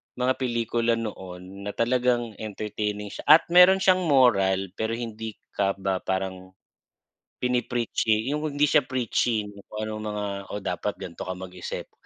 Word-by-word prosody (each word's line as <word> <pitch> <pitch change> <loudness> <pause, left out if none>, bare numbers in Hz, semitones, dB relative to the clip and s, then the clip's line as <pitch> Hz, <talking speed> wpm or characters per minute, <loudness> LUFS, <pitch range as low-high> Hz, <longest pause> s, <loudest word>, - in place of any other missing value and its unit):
mga 125 +1 +1
pelikula 120 -2 0
noon 95 -3 -7
na 105 - -3
talagang 120 -2 +1
entertaining 105 -1 -4
siya - - -9
at 155 +3 +8
meron 180 +2 +7
siyang 185 -2 +4
moral 95 - +3
pero 110 +1 -1
hindi 110 -2 -5 0.2
ka 100 -1 +1
ba 95 -1 -1
parang 95 -1 -4 0.9
pini-preachy 120 -1 0
yung 150 - 0 0.2
hindi 145 - +2
siya 150 +1 +5
preachy 120 -3 0 0.2
kung 105 0 -5
anong 110 0 -4
mga, 105 - -2 0.3
oh, 100 - -5
dapat 100 +2 -2
ganito 85 0 -8
ka 95 - -3
mag-isip. 90 -1 -7
110 Hz, 145 wpm, -26 LUFS, 95-125 Hz, 0.9 s, at